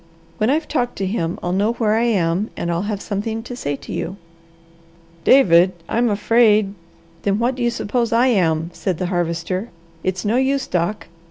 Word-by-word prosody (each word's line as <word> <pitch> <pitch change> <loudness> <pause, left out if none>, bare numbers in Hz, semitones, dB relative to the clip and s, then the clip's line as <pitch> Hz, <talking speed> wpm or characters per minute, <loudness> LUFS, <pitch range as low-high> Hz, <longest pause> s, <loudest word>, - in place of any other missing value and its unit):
When 215 - +2
I've 305 +3 +1
talked 245 -5 -1
to 195 - -2
him, 180 -4 -2
I'll 175 - -1
know 205 +5 +1
where 220 -3 +1
I 230 +2 +2
am 190 -2 +1
and 170 - -2
I'll 175 +5 -2
have 205 -2 -3
something 220 +2 -3
to 245 - -7
say 145 -12 -3
to - - -9
you." 185 +4 -4 1.1
"David, 185 -8 +6
I'm 235 +1 +1
afraid 210 -1 +3 0.2
" 165 0 -30
"Then 200 0 +1
what 240 +3 +1
do 255 - -7
you 240 - +2
suppose 235 0 -1
I 235 +2 +4
am?" 170 -8 +1
said 185 -4 -2
the 180 - -2
Harvester. 175 +4 -2 0.3
"It's 185 0 -2
no 220 +4 +2
use, 265 +1 +1
Doc. 180 +4 -1
205 Hz, 190 wpm, -20 LUFS, 175-235 Hz, 1.1 s, David